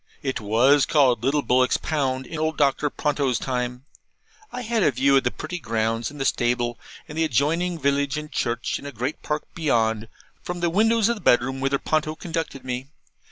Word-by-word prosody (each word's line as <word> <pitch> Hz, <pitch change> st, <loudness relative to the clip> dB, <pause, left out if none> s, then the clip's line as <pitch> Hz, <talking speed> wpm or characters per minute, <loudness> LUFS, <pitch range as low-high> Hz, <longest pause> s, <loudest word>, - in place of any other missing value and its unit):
It 130 Hz, -4 st, -2 dB
was 125 Hz, +7 st, +4 dB
called 130 Hz, -7 st, +3 dB
Little 140 Hz, +3 st, +1 dB
Bullock's 125 Hz, 0 st, +3 dB
Pound 130 Hz, -4 st, -1 dB
in 160 Hz, -, -6 dB
old 155 Hz, 0 st, -1 dB
Doctor 145 Hz, 0 st, +2 dB
Ponto's 140 Hz, -4 st, 0 dB
time. 125 Hz, 0 st, -3 dB, 0.7 s
I 250 Hz, -, -5 dB
had 230 Hz, -1 st, 0 dB
a -, -, +5 dB
view 135 Hz, +2 st, +3 dB
of 135 Hz, -, +4 dB
the 125 Hz, -, +2 dB
pretty 180 Hz, +7 st, -6 dB
grounds, 115 Hz, -3 st, -1 dB
and 145 Hz, 0 st, -11 dB
the 135 Hz, -, -1 dB
stable, 120 Hz, -1 st, 0 dB, 0.3 s
and 150 Hz, -, -9 dB
the 160 Hz, -, +1 dB
adjoining 160 Hz, +5 st, +1 dB
village 140 Hz, -1 st, 0 dB
and 150 Hz, 0 st, -6 dB
church, 120 Hz, 0 st, -1 dB
and 140 Hz, -, -9 dB
a -, -, -6 dB
great 125 Hz, +4 st, -4 dB
park 150 Hz, 0 st, -2 dB
beyond, 115 Hz, -8 st, +1 dB, 0.3 s
from 175 Hz, 0 st, -5 dB
the 170 Hz, -1 st, 0 dB
windows 220 Hz, +3 st, +3 dB
of 235 Hz, 0 st, 0 dB
the -, -, -11 dB
bedroom 125 Hz, +2 st, +3 dB
whither 135 Hz, +1 st, +1 dB
Ponto 155 Hz, +2 st, -1 dB
conducted 160 Hz, -6 st, -5 dB
me. 125 Hz, +1 st, -4 dB
140 Hz, 195 wpm, -24 LUFS, 125-155 Hz, 0.7 s, a